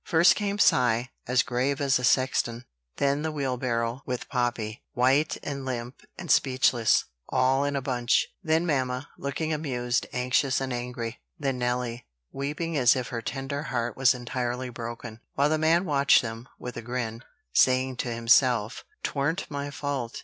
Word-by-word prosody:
First 170 0 +5
came 205 -1 -2
Cy, 125 - +3 0.2
as 125 +1 +3
grave 130 +3 -1
as 135 -3 +2
a - - -6
sexton; 125 -2 +1 0.3
then 140 +1 +1
the 160 0 -2
wheelbarrow 125 -4 -1
with 125 -1 -4
Poppy, 120 -4 -2
white 135 +5 +2
and 140 -2 -4
limp 125 -1 -5 0.2
and 170 -5 -3
speechless, 130 -4 +3 0.2
all 130 +1 +2
in 145 0 -1
a 135 - -1
bunch; 125 -3 +2 0.2
then 160 -1 +1
mamma, 130 -3 -1
looking 155 +3 -2
amused, 125 -5 -1
anxious 125 +2 +1
and 135 -1 -3
angry; 120 -1 -5 0.2
then 135 -5 -2
Nelly, 125 -1 -2 0.2
weeping 150 +4 -3
as 130 -3 +5
if 125 -2 -3
her 115 -2 -3
tender 135 +3 -4
heart 120 -5 -2
was 130 0 +4
entirely 125 +1 -3
broken; 120 -1 -7 0.2
while 140 +1 +3
the 155 0 +1
man 165 +3 +3
watched 140 -5 +4
them, 115 +2 -6
with 125 -1 -7
a - - -4
grin, 115 -1 -4 0.3
saying 130 0 +3
to 120 - -2
himself: 115 -1 +3 0.2
"Twarn't 150 +6 -1
my 140 0 -3
fault. 140 -4 -4
130 Hz, 160 wpm, -27 LUFS, 120-140 Hz, 0.3 s, First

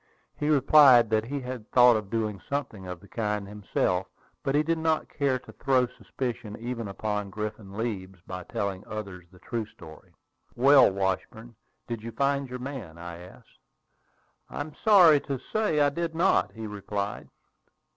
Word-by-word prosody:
He 150 - -2
replied 135 -5 +6
that 110 0 +2
he 140 +3 -4
had 125 -3 -7
thought 125 -1 +6
of 105 -3 -3
doing 110 -3 -2
something 125 -9 -4
of 90 -1 -7
the 100 - -15
kind 105 -2 -2
himself; 95 -2 -1 0.3
but 135 - -1
he 150 - +4
did 165 +1 0
not 160 -1 0
care 140 -3 0
to 125 - -14
throw 130 -2 +2
suspicion 120 -3 -6
even 120 -1 -4
upon 105 0 -3
Griffin 105 -1 -6
Leeds 95 -5 -4
by 90 -1 -6
telling 100 -4 -3
others 100 -5 -7
the 90 - -17
true 110 +3 -4
story. 80 -6 -15 0.4
"Well, 135 +2 +7
Washburn, 100 +5 -3 0.3
did 115 -2 -4
you 115 +1 -6
find 140 +2 0
your 125 - -5
man?" 125 - -7
I 85 0 -8
asked. 90 +1 -15 0.9
"I - - -5
am 150 +1 -6
sorry 180 -9 +7
to 140 -1 -4 0.2
say 215 -8 +1
I 145 -1 +5
did 165 +2 -3
not," 180 +4 +3
he 110 -1 -7
replied. 105 0 -4
115 Hz, 165 wpm, -27 LUFS, 100-140 Hz, 0.9 s, Well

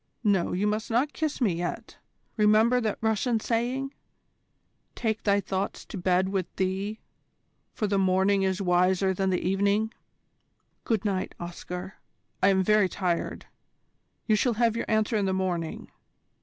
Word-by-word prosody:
No, 200 -5 +2
you 190 +3 0
must 215 +1 -1
not 255 +6 +1
kiss 310 -2 -2
me 220 -9 +2
yet. 175 +1 -5 0.4
Remember 220 +3 +4
that 215 -3 -1
Russian 220 +1 +1
saying, 250 +5 -1 1.0
'Take 220 -1 -1
thy 200 -1 +3
thoughts 195 0 -3
to - - -9
bed 185 0 +1
with 190 -3 -1
thee, 195 +3 -2 0.8
for 215 - -1
the 200 -1 +1
morning 190 +1 +3
is 190 0 0
wiser 185 +1 +3
than 190 +1 0
the 180 -1 0
evening.' 200 +3 +1 0.9
Good 220 -3 0
night, 190 -2 -1
Oscar, 180 +2 -7 0.4
I 190 - +5
am 190 -1 +4
very 210 -1 +4
tired. 180 -3 -2 0.8
You 215 - +3
shall 240 +3 +2
have 230 0 +2
your 230 - -2
answer 220 +1 +2
in 205 - +1
the 190 - 0
morning. 180 -4 -3
200 Hz, 150 wpm, -27 LUFS, 185-220 Hz, 1.0 s, I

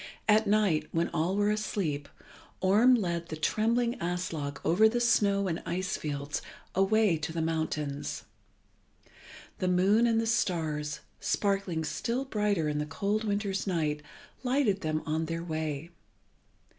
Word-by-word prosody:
At 215 0 +4
night, 200 -6 +2
when 165 +1 0
all 170 +3 0
were 205 +1 +2
asleep, 175 -9 -2 0.5
Orm 215 +7 +5
led 170 -6 -1
the 160 - -5
trembling 230 +9 +1
Aslog 170 -5 -3
over 215 +6 +5
the 240 +2 0
snow 200 -4 +3
and 165 -2 -2
ice 185 +2 -2
fields 145 -1 -3 0.3
away 195 -1 +3
to 155 +1 -4
the 165 - -3
mountains. 160 -3 -2 1.4
The 185 - 0
moon 195 +6 +4
and 225 -1 +3
the 225 - 0
stars, 160 -10 -1 0.2
sparkling 195 -5 0
still 230 - -2
brighter 210 - 0
in 150 0 -1
the 150 - -2
cold 205 +7 -1
winter's 205 -1 -1
night, 155 -5 0 0.4
lighted 250 -6 +1
them 155 0 -1
on 160 +1 -1
their 165 +1 -3
way. 155 -1 -3
180 Hz, 140 wpm, -29 LUFS, 155-210 Hz, 1.4 s, Orm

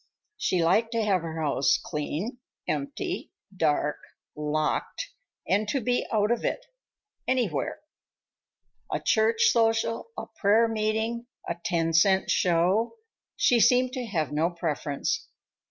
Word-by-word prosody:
She 180 - +1
liked 220 +7 +2
to 230 -1 +1
have 195 -4 +2
her 165 -1 -5
house 140 -3 +2
clean, 170 - -4 0.3
empty, 350 +7 -3 0.2
dark, 150 -3 +1 0.4
locked, 150 - -2 0.4
and 205 +3 +2
to 275 - +1
be 245 +1 0
out 210 0 +2
of 240 - 0
it—anywhere. 260 - -3 1.1
A - - 0
church 225 +1 +2
social, 225 - +1
a - - -4
prayer 215 +3 +3
meeting, 220 +2 -1 0.2
a 170 - -2
ten 165 -2 0
cent 190 +4 +4
show; 185 - +2 0.4
she 245 - +3
seemed 250 +2 +4
to 255 -3 -4
have 160 -8 -1
no 155 +3 +1
preference. 155 -4 -2
210 Hz, 120 wpm, -27 LUFS, 165-235 Hz, 1.1 s, cent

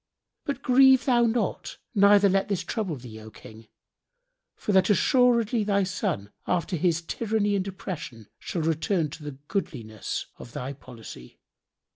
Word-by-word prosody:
But 280 -1 -4
grieve 265 0 +6
thou 240 -3 +4
not, 230 +1 -2 0.2
neither 200 -1 +6
let 195 0 +1
this 195 -3 -1
trouble 195 -5 -3
thee, 120 -4 -10
O 110 0 -11
King, 110 +1 -14 0.9
for - - -3
that 190 0 +4
assuredly 235 0 +3
thy 200 -1 +1
son, 180 - -3 0.2
after 180 +1 0
his 170 0 +1
tyranny 210 +2 -1
and 195 0 -1
oppression, 165 - -7
shall 170 - -3
return 165 0 0
to 160 - -9
the 145 -2 -7
goodliness 115 - -4
of 120 - -11
thy 130 +2 -5
policy. 115 - -12
190 Hz, 145 wpm, -26 LUFS, 140-215 Hz, 0.9 s, grieve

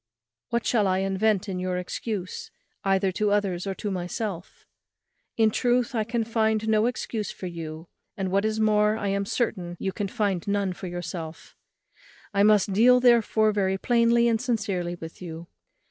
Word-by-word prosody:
What 235 0 -1
shall 215 -5 +2
I 185 0 +2
invent 195 +2 +1
in 185 -2 -3
your 180 0 -2
excuse, 185 +1 -4 0.3
either 195 0 +2
to 210 +3 0
others 200 -3 0
or 195 - -2
to 205 0 -4
myself? 185 0 -5 0.7
In 220 -1 +4
truth, 245 +2 +1
I 220 -2 +1
can 230 +1 -1
find 220 -1 0
no 220 +1 +3
excuse 225 -3 -3
for - - -8
you, 165 -2 -6 0.3
and, 190 -2 -2
what 195 +1 +2
is 220 0 -1
more, 210 0 +3
I 205 -3 -2
am 200 0 -1
certain 180 -8 -2
you 190 - -2
can 200 +2 -3
find 195 -3 -1
none 200 -2 0
for 185 - -7
yourself. 165 -2 -7 0.8
I 200 - +2
must 205 -1 +4
deal 250 +5 +6
therefore 230 -3 +4
very 190 -2 0
plainly 235 +2 +3
and 225 -1 +1
sincerely 200 -8 -1
with 165 0 -10
you. 165 -1 -7
200 Hz, 170 wpm, -26 LUFS, 185-220 Hz, 0.8 s, deal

